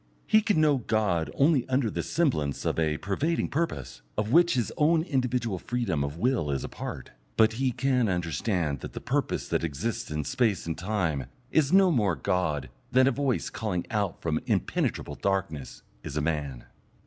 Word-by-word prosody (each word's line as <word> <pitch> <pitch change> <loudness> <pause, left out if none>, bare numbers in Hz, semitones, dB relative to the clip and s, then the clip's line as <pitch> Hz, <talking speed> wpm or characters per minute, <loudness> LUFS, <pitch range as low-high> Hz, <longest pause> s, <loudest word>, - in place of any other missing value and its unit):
He 215 - +5
can 210 -6 +2
know 150 -2 +4
God 105 -8 0
only 140 -3 +3
under 130 -4 +1
the - - -2
semblance 125 - 0
of - - 0
a 80 -1 +1
pervading 140 - -1
purpose, 70 - -3 0.2
of 105 +1 -1
which 170 0 +5
his 120 -4 0
own 160 +2 +3
individual 125 - -1
freedom 105 -13 -1
of 70 +2 -4
will 115 - +1
is 70 -2 -1
a - - -3
part, - - -7 0.3
but 110 0 +5
he 130 +2 0
can 125 -2 +1
understand 85 - -1
that - - -8
the - - -5
purpose - - -1
that - - 0
exists 85 +9 -3
in 75 0 -2
space 110 - 0
and 80 -1 -2
time 85 - -1 0.2
is 150 -2 +3
no 190 -1 +6
more 105 - +2
God 75 -9 -1 0.2
than 130 0 +5
a 135 - +4
voice 135 -1 -1
calling 100 -6 -2
out 100 -5 0
of 80 -2 +1
impenetrable - - 0
darkness 90 -8 -2 0.2
is 70 - -5
a - - +1
man. 75 -5 -2
105 Hz, 180 wpm, -28 LUFS, 80-130 Hz, 0.3 s, no